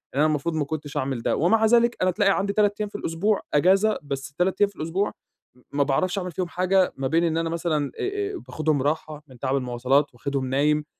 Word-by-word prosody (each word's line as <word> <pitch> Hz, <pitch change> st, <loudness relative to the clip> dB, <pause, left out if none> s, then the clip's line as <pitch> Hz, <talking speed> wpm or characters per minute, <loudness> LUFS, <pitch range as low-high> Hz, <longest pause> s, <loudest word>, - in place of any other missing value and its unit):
إن -, -, 0 dB
أنا 150 Hz, -, +5 dB
المفروض 155 Hz, +1 st, 0 dB
ما 150 Hz, -, 0 dB
كنتش 145 Hz, 0 st, -5 dB
أعمل 130 Hz, -3 st, -2 dB
ده، -, -, 0 dB
ومع 220 Hz, +7 st, +3 dB
ذلك 235 Hz, +1 st, +4 dB
أنا 185 Hz, 0 st, +3 dB
تلاقي 195 Hz, +1 st, +2 dB
عندي 200 Hz, +1 st, -1 dB
3 205 Hz, -1 st, +2 dB
أيام 210 Hz, -, -2 dB
في -, -, -16 dB
الأسبوع 195 Hz, +6 st, 0 dB
أجازة، 195 Hz, +8 st, +3 dB
بس 135 Hz, -1 st, -5 dB
3 180 Hz, +6 st, 0 dB
أيام 205 Hz, -, +5 dB
في 200 Hz, -, -22 dB
الأسبوع 175 Hz, +6 st, -1 dB, 0.4 s
م 125 Hz, -, -23 dB
ما 140 Hz, 0 st, +2 dB
باعرفش 175 Hz, +7 st, 0 dB
أعمل 180 Hz, -2 st, -3 dB
فيهم 180 Hz, +1 st, -3 dB
حاجة، 185 Hz, +2 st, +1 dB
ما 135 Hz, 0 st, -1 dB
بين 165 Hz, +5 st, +2 dB
إن 165 Hz, -1 st, +1 dB
أنا 165 Hz, 0 st, 0 dB
مثلًا 160 Hz, -4 st, -1 dB
آآ، 400 Hz, +1 st, -2 dB
باخدهم 155 Hz, -3 st, 0 dB
راحة 150 Hz, 0 st, -2 dB
من 130 Hz, -3 st, -16 dB
تعب 135 Hz, +1 st, 0 dB
المواصلات، 130 Hz, +2 st, +1 dB
واخدهم 135 Hz, +2 st, -3 dB
نايم، 150 Hz, +3 st, +1 dB
160 Hz, 225 wpm, -24 LUFS, 140-195 Hz, 0.4 s, أنا